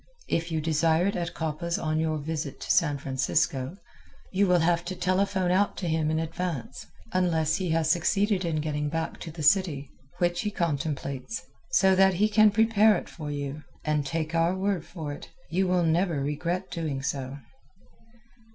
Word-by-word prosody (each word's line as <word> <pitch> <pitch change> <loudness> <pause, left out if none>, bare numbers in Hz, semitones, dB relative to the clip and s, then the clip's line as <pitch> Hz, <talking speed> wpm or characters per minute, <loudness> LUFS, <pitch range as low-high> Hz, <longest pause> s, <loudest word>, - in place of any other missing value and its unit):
If 165 +1 -1
you 160 -1 0
desire 160 +2 +2
it 200 - 0
at 170 -1 -3
Coppa's 160 +2 -2
on 155 -1 -1
your 160 -1 0
visit 150 -1 -4
to - - -1
San 150 -5 +3
Francisco 135 +2 -1 0.5
you 200 +1 +2
will 180 -2 +4
have 170 +1 +2
to 185 +1 -4
telephone 185 +1 +1
out 200 +3 +2
to 180 - -3
him 160 -1 +1
in 160 - +1
advance 160 -5 -4 0.3
(unless 165 -4 +2
he 185 -3 -2
has 160 -1 +2
succeeded 195 +3 +2
in 160 -3 -1
getting 150 -1 -2
back 165 +1 -3
to - - -7
the 155 -1 -7
city, 150 -4 +2 0.3
which 175 0 +1
he 210 - -1
contemplates) 155 - -3 0.3
so 190 -1 +4
that 190 0 +5
he 210 +4 +3
can 215 0 +6
prepare 220 0 +4
it - - -7
for 155 -3 -7
you, 145 0 -4 0.2
and, 150 -1 +1
take 160 +3 -3
our 165 +2 +2
word 190 -3 -1
for 160 -5 -5
it, 145 - -10 0.2
you 185 +3 +1
will 180 -1 +2
never 165 -1 +1
regret 170 +6 -2
doing 150 -6 -3
so. 135 -1 -3
165 Hz, 180 wpm, -27 LUFS, 150-185 Hz, 0.5 s, can